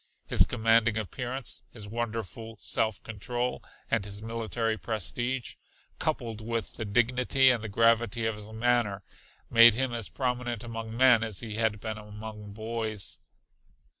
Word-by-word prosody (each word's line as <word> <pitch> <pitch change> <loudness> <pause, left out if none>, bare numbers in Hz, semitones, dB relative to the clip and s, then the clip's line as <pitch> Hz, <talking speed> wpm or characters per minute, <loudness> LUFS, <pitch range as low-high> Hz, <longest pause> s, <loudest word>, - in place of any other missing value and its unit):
His - - +4
commanding 115 -1 +3
appearance, 125 +4 -3
his 105 -4 -9
wonderful 115 -1 -4
self 110 -4 -1
control 120 +3 -3 0.3
and 115 -3 +2
his 100 0 -5
military 115 0 -2
prestige, 120 +4 -2 0.4
coupled 115 -2 -2
with 115 -1 -3
the 110 - -5
dignity 125 +4 +4
and 110 -4 -2
gravity 115 0 +3
of 110 - +1
his 105 0 -9
manner, 110 -3 +1 0.5
made 115 -1 +9
him 130 0 +1
as 115 -3 -2
prominent 125 -3 -2
among 115 -1 -6
men 125 -3 +6
as 110 -4 -2
he 110 -3 -5
had 110 -2 +1
been 110 0 -4
among 105 0 -9
boys. 110 -1 -2
115 Hz, 135 wpm, -29 LUFS, 110-120 Hz, 0.5 s, made